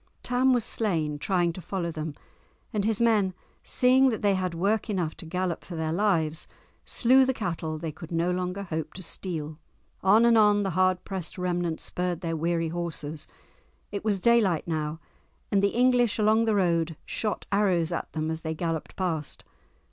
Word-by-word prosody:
Tam 255 +1 +2
was 245 -3 +2
slain, 160 -11 -1
trying 175 0 +1
to 185 - -8
follow 175 -1 -3
them, 155 -2 -5 0.6
and 205 -2 0
his 220 -1 +2
men, 210 -6 +3 0.3
seeing 260 +1 +4
that 220 -4 -3
they 200 -1 +4
had 185 -2 -1
work 205 +6 0
enough 180 -6 -1
to 165 - -5
gallop 180 0 -2
for 175 - -8
their 160 -1 -2
lives, 170 -5 +1 0.4
slew 260 +2 +5
the 260 0 +1
cattle 165 -6 -3
they 160 0 -4
could 160 +2 -11
no 170 +1 +1
longer 180 +2 -2
hope 160 -4 -4
to 185 - -7
steal. 160 -4 -4 0.4
On 210 +5 +5
and 230 -1 +6
on 205 -1 +4
the 195 - -1
hard 185 +1 +2
pressed 190 -3 -5
remnant 175 -2 -1
spurred 180 -1 -2
their 165 -2 -2
weary 165 +1 0
horses. 160 -3 -4 0.6
It 200 - -4
was 205 -3 +1
daylight 205 -7 +3
now, 155 -1 -2 0.5
and 200 - +3
the 200 - +4
English 245 -1 +3
along 220 +1 +3
the 220 -2 +2
road 170 -4 +1
shot 210 -3 -3
arrows 185 -5 +2
at 170 - -3
them 155 0 -2
as 160 0 -3
they 160 0 -3
galloped 165 -1 -3
past. 165 -6 -3
180 Hz, 180 wpm, -27 LUFS, 165-210 Hz, 0.6 s, and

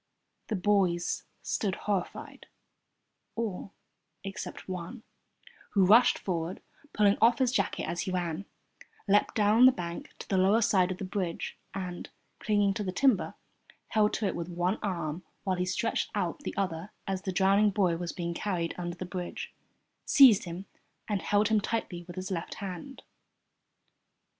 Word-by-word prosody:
The 220 - -1
boys 185 -3 +1 0.2
stood 195 -3 -1
horrified 200 -4 -4 0.9
all 205 -4 -4 0.5
except 195 0 -6
one, 185 +6 -6 0.7
who 195 -2 +5
rushed 225 +6 +6
forward, 175 -1 -3 0.3
pulling 205 -1 +3
off 235 +1 +6
his 260 -2 +2
jacket 255 - 0
as 175 - -2
he 185 - -3
ran, 175 0 -2 0.6
leapt 205 +1 +3
down 220 +4 +6
the - - +8
bank 170 -6 -6
to - - -9
the 190 - +1
lower 205 +5 +4
side 190 -3 +3
of 185 - -3
the 195 - -5
bridge, 185 -3 -3 0.2
and, 180 -2 -5 0.3
clinging 205 -2 +2
to 210 - -3
the 185 - -2
timber, 240 +1 +2 0.5
held 210 -1 +3
to 215 - -1
it 195 - 0
with 170 +1 -4
one 175 +4 -1
arm 170 -4 -3 0.2
while 190 -2 0
he 180 - 0
stretched 185 +5 -1
out - - -1
the 290 - -6
other 185 -1 -2
as 195 -2 -2
the 190 - -3
drowning 195 +3 +4
boy 190 -4 +2
was 170 0 -4
being 170 -2 -3
carried 170 -3 -2
under 175 -1 -4
the 185 - -6
bridge, 180 -1 -6 0.5
seized 250 -10 +7
him, 175 +3 -6 0.4
and 205 -3 -1
held 205 +1 +2
him 215 -1 +3
tightly 190 -6 -3
with 175 - -9
his 185 +1 -5
left 170 -2 -3
hand. 200 +7 -7
190 Hz, 160 wpm, -29 LUFS, 175-210 Hz, 0.9 s, the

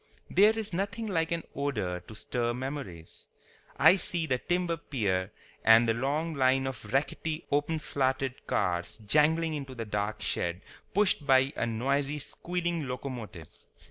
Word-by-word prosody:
There 215 +3 +5
is 220 -3 -3
nothing 200 +5 -2
like 165 -6 0
an 170 -1 -1
odor 105 -11 -1
to 110 +5 -13
stir 120 +2 -2
memories. 130 - -6 0.5
I 185 - +7
see 170 -3 -1
the 130 -4 0
timber 175 +1 0
pier 100 -11 -1 0.3
and 115 +1 +7
the 115 - +3
long 145 +7 -1
line 135 -1 +3
of 130 -4 -6
rackety 155 +4 -1
openslatted 140 -3 0
cars 85 -1 0
jangling 155 +7 +3
into 135 -3 -5
the 115 -2 -4
dark 105 0 -2
shed, 85 +2 -2 0.3
pushed 195 -7 +3
by 135 0 +4
a 120 - -1
noisy, 135 +5 0
squealing 170 +1 -2
locomotive. 120 - -6
135 Hz, 140 wpm, -29 LUFS, 115-160 Hz, 0.5 s, I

